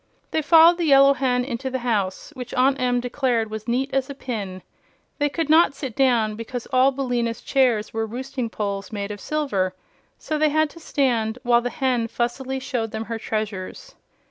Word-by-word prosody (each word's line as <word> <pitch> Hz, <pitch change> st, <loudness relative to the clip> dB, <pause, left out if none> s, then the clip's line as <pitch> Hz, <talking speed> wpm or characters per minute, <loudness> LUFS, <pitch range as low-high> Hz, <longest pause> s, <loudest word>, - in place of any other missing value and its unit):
They 315 Hz, -, +1 dB
followed 330 Hz, +3 st, +6 dB
the 340 Hz, -, +1 dB
Yellow 275 Hz, -1 st, +6 dB
Hen 250 Hz, -2 st, 0 dB
into 260 Hz, 0 st, -4 dB
the 260 Hz, -, -2 dB
house, 205 Hz, 0 st, -1 dB
which 250 Hz, -2 st, -7 dB
Aunt 265 Hz, +1 st, +2 dB
Em 245 Hz, -1 st, +2 dB
declared 245 Hz, -3 st, -1 dB
was 220 Hz, 0 st, -6 dB
neat 260 Hz, +3 st, 0 dB
as 270 Hz, 0 st, 0 dB
a 280 Hz, -, -6 dB
pin. 200 Hz, -9 st, -5 dB, 0.6 s
They 290 Hz, 0 st, +2 dB
could 325 Hz, +1 st, -2 dB
not 315 Hz, -2 st, +5 dB
sit 265 Hz, -5 st, -6 dB
down, 240 Hz, -5 st, +2 dB
because 230 Hz, +2 st, -6 dB
all 260 Hz, +2 st, +5 dB
Billina's 245 Hz, -4 st, -2 dB
chairs 245 Hz, -6 st, +1 dB
were 225 Hz, 0 st, -1 dB
roosting 255 Hz, +1 st, -4 dB
poles 200 Hz, -2 st, -4 dB
made 205 Hz, -1 st, -4 dB
of 205 Hz, -, -7 dB
silver; 200 Hz, -12 st, -1 dB, 0.4 s
so 310 Hz, -1 st, -3 dB
they 310 Hz, 0 st, +4 dB
had 310 Hz, 0 st, +1 dB
to 335 Hz, -, -13 dB
stand 245 Hz, -8 st, 0 dB
while 240 Hz, -1 st, +4 dB
the 245 Hz, -, -2 dB
hen 255 Hz, -5 st, 0 dB
fussily 255 Hz, +3 st, -2 dB
showed 245 Hz, -3 st, -3 dB
them 220 Hz, +1 st, -5 dB
her 230 Hz, 0 st, -4 dB
treasures. 215 Hz, -, -5 dB
250 Hz, 190 wpm, -23 LUFS, 225-275 Hz, 0.6 s, followed